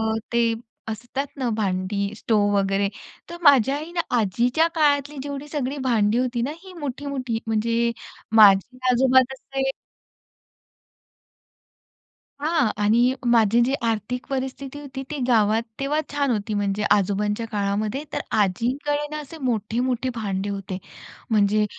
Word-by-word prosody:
अ, 220 0 0 0.2
ते 235 -1 +3 0.3
असतात 245 +5 -4
ना 260 -3 -1
भांडी, 200 0 -1
स्टोव 205 -2 +1
वगैरे, 195 0 +1 0.4
तर 345 - -7
माझ्या 275 -3 +5
आईनं 335 +4 -3 0.2
आजीच्या 240 - +2
काळातली 290 -2 +2
जेवढी 285 +1 -6
सगळी 285 -1 -3
भांडी 225 -3 +2
होती 250 -1 0
ना, 260 - -1
ही 380 - -11
मोठी-मोठी, 270 -4 -3
म्हणजे, 230 +2 +1 0.4
माझी 210 +4 +6
आजोबा 260 +1 +5
तसे 270 0 -3 2.7
हां 310 -4 +2
आणि 235 +5 +4 0.2
माझी 230 -1 +4
जी 265 - 0
आर्थिक 225 +3 -2
परिस्थिती 270 +1 -4
होती 270 -2 -7
ती 300 - -3
गावात 220 -2 +3 0.2
तेव्हा 280 +3 0
छान 285 -2 +1
होती. 215 -1 -2
म्हणजे, 205 0 -1
आजोबांच्या 205 +2 +1
काळामध्ये, 210 +4 -1
तर - - 0 0.2
आजींकडे 265 +9 0
ना 305 - -3
असे 300 +3 -10
मोठे-मोठे 245 0 -1
भांडे 200 -3 -2
होते. 195 -1 -4 0.5
म्हणजे, 210 -1 +3
235 Hz, 125 wpm, -23 LUFS, 210-275 Hz, 2.7 s, माझी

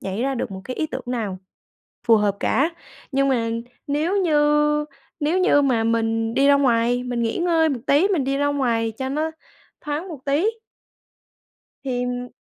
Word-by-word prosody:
nhảy 195 +4 -3
ra 270 +1 0
được 235 - -3
một 190 -1 -7
cái 255 - -6
ý 310 - -1
tưởng 265 -4 -6
nào 220 -6 -3 0.7
phù 230 -2 +6
hợp 205 -2 +1
cả, 295 +5 +2 0.4
nhưng 275 +1 +2
mà 235 -4 +1 0.4
nếu 305 +7 0
như 300 -2 +3 0.4
nếu 310 +5 +1
như 365 -6 +4
mà 245 -5 +2
mình 225 0 0
đi 275 +1 +3
ra 285 - +6
ngoài 245 -3 +2
mình 245 -1 -2
nghỉ 225 -1 -1
ngơi 335 -2 +2
một 270 -5 -2
tí, 295 +8 +4
mình 340 -10 +1
đi 275 +1 0
ra 285 - +1
ngoài 235 -6 0
cho 265 - -2
nó 305 +4 -1 0.5
thoáng 300 +5 -4
một 320 -5 -7
tí 285 +7 +1 1.4
thì 245 -2 -3
270 Hz, 180 wpm, -22 LUFS, 235-295 Hz, 1.4 s, phù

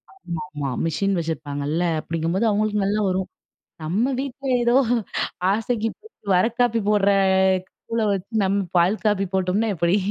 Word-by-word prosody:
ஆமாமா. 150 - -5 0.2
மிஷின் 195 +5 0
வச்சிருப்பாங்கல்ல. 155 0 -2 0.2
அப்படிங்கும்போது, 165 +6 -1
அவங்களுக்கு 210 -1 +1
நல்லா 210 +2 +1
வரும். 185 0 -1 0.5
நம்ம 200 +11 0
வீட்ல 275 0 -6 0.2
ஏதோ 240 +1 +3 0.8
ஆசைக்கு 225 +1 -1 0.5
வர 180 - +4
காப்பி 235 -2 +2
போடுற 200 -1 +3 0.8
தூள 230 0 -1
வச்சு 195 0 -3 0.2
நம்ம 195 +1 +1 0.2
பால் 180 +5 +3
காப்பி 200 -2 +2
போட்டோம்னா 190 +4 +1
எப்படி? 170 +3 +2
195 Hz, 125 wpm, -23 LUFS, 170-215 Hz, 0.8 s, வர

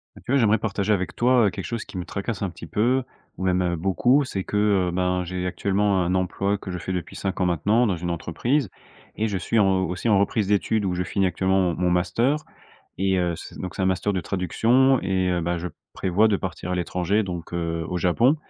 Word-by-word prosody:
Bah, - - -13
tu - - -3
vois, 140 - +4
j'aimerais 110 -1 +4
partager 100 -1 -1
avec 95 -3 0
toi, 125 -1 +4
heu, - - +3
quelque - - -6
chose 115 -2 -4
qui - - -9
me 90 - -3
tracasse 100 +4 -4
un 100 - -1
petit 85 -1 -10
peu 125 +8 +1 0.3
ou 95 - -3
même, 90 0 +2
heu, 90 -1 0
beaucoup, 120 - +2
c'est 95 -7 -3
que, 105 - -3 0.3
heu, - - -3
ben, 90 0 0
j'ai 90 +1 -4
actuellement 100 0 +1
un 90 +1 0
emploi, 100 +2 0
que 95 - -9
je 90 - -3
fais 90 - -5
depuis 90 -2 -4
5 95 -1 -3
ans 90 - +2
maintenant. 100 +8 +2
Dans 95 - +1
une 85 +1 -4
entreprise, 95 - -1 0.5
et 110 +1 0
je 100 - -1
suis 115 - -1
en 95 -3 +3
aussi 90 +6 -2
en 100 -2 +5
reprise 100 0 +1
d'études, 105 +1 +1
où 90 -2 -1
je 90 - -1
finis 100 +1 0
actuellement 95 +2 +1
mon 90 -2 +1
mon 90 +1 +1
master. 90 - +2 0.6
Et 95 0 +1
heu, 85 -2 0
c - - -10
donc 90 - -5
c'est - - -2
un 95 - +2
master 95 +2 +1
de 95 - -1
traduction, 120 +9 +2
et 95 -1 0
heu, 90 - +1
bah, 85 +1 -1
je 90 +2 -4 0.3
prévois 95 +4 +2
de 105 - +2
partir 95 -1 -5
à - - 0
l'étranger 90 +4 0
donc, 90 -3 -6
heu, 85 -1 -2
au 90 - -4
Japon. 115 - +3
95 Hz, 245 wpm, -24 LUFS, 90-105 Hz, 0.6 s, en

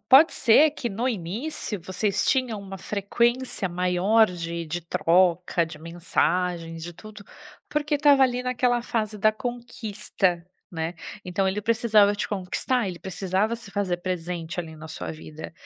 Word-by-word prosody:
Pode 280 +5 +8
ser 285 +6 +5
que, 275 -5 -4
no 230 +5 -1
início, 215 - -4
vocês 190 +3 -1
tinham 250 -6 +1
uma 195 -1 -8
frequência 235 +3 0
maior 180 +5 +3
de 170 -1 -4
de 175 +3 -3
troca, 175 0 +2
de 160 -2 -10
mensagens, 170 0 -1
de 175 +1 -6
tudo, 210 +3 -12 0.4
porque 300 0 0
estava 285 -2 +5
ali 250 -1 +2
naquela 250 -1 +1
fase 215 -3 -2
da 215 +2 +4
conquista, 215 -6 -2 0.3
né. 165 -1 -3 0.3
Então, 185 +2 0
ele 195 +2 -1
precisava 215 -2 +4
te 205 - -3
conquistar, 205 +5 -1
ele 175 -2 -6
precisava 190 +4 -1
se 230 -4 -11
fazer 195 -4 0
presente 175 -1 -3
ali 160 -2 -9
na 155 +1 -9
sua 160 - -5
vida 155 0 -9
195 Hz, 150 wpm, -25 LUFS, 175-235 Hz, 0.4 s, Pode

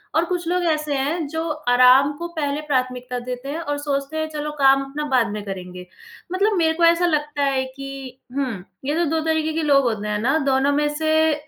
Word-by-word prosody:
और 325 +2 +3
कुछ 350 -1 -3
लोग 360 +1 +1
ऐसे 305 -2 -2
हैं 295 +3 -1
जो 320 +2 -3 0.2
आराम 255 +3 +6
को 345 - -4
पहले 290 -1 -1
प्राथमिकता 255 -2 -1
देते 250 +2 -5
हैं 315 +3 -3
और 290 -3 -3
सोचते 285 +1 -3
हैं, 315 0 -1
चलो 300 0 -3
काम 275 0 +5
अपना 280 +2 -5
बाद 250 -3 +3
में 210 - -4
करेंगे 180 -2 -7 0.5
मतलब 410 +3 +2
मेरे 320 -2 +3
को 340 - -1
ऐसा 335 +1 +4
लगता 295 -3 0
है 270 -1 +1
कि 270 -1 -9 0.2
हुँ, 255 -10 -2 0.2
ये 290 +3 0
तो 345 - +1
2 320 - +1
तरीके 315 -1 0
के 325 - -1
लोग 280 -2 +4
होते 215 -4 -1
हैं 210 0 -1
ना 270 +8 +2
दोनों 270 +1 +3
में 295 +1 +2
से 315 0 +2
285 Hz, 215 wpm, -22 LUFS, 260-315 Hz, 0.5 s, आराम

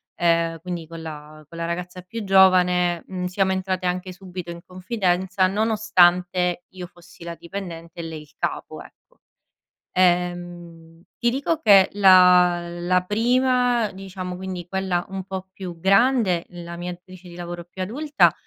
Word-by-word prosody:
ehm, 165 -1 +1
quindi 175 -2 -6
con 165 0 -9
la 155 -1 -10
con 165 - -12
la 165 - -3
ragazza 180 +1 -5
più 215 +5 -7
giovane, 180 -2 +4
mhmm, 185 -1 -4
siamo 190 +1 0
entrate 185 -1 -2
anche 180 +1 -2
subito 180 -1 -8
in 170 - -8
confidenza 185 -1 0
nonostante 180 -4 +2
io 180 -1 -9
fossi 175 -1 -17
la 170 0 -6
dipendente 170 -2 -8
e - - -4
lei 160 -2 -7
il 150 0 -18
capo, - - -4
ecco. - - -19 0.7
Ehm, 175 -2 -1 0.2
ti 235 -1 +2
dico 285 +5 -1
che 195 -7 +6
la 180 -3 +6
la 175 +1 0
prima, 245 +1 +2
diciamo 185 -1 -7
quindi 185 -2 -6
quella 190 -2 -1
un 190 -1 -6
po’ 190 0 -6
più 180 -3 -8
grande, 195 -1 +3
la 170 -1 -8
mia 175 +1 -5
datrice 180 0 -13
di 170 - -11
lavoro 175 0 -7
più 185 +2 -7
adulta, 290 +9 +2
180 Hz, 155 wpm, -23 LUFS, 175-190 Hz, 0.7 s, che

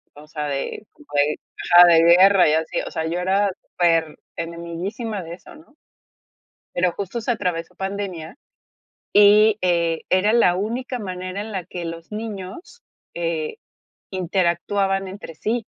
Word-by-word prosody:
o 150 +1 -14
sea, 150 -1 -4
de 140 +8 -4
como 300 -2 -20
de 145 +1 +2 0.4
ajá, 175 0 +10
de 165 -1 +6
guerra 180 +1 +6
y - - +2
así. 160 0 -1
O - - -7
sea, 160 - -3
yo 170 +2 -2
era 195 +2 +1 0.3
per 165 -3 +2 0.2
enemiguísima 175 +6 -5
de 165 0 -8
eso, - - -16
¿no? 305 -1 -19 1.0
Pero 180 0 +1
justo 200 +6 -5
se 230 - 0
atravesó 180 -7 -3
pandemia 190 -2 -5 0.8
y, 210 +1 +6
eh, 170 -2 +1
era 185 +4 +3
la 230 -7 +4
única 245 +6 -3
manera 185 -1 -5
en 220 +1 -7
la 190 -2 -3
que 175 -1 -6
los 165 +2 -8
niños, 210 - -7 0.3
eh, 165 -2 -3 0.6
interactuaban 190 +1 0
entre 185 -4 -9
sí. 225 +6 -2
185 Hz, 150 wpm, -22 LUFS, 170-205 Hz, 1.0 s, ajá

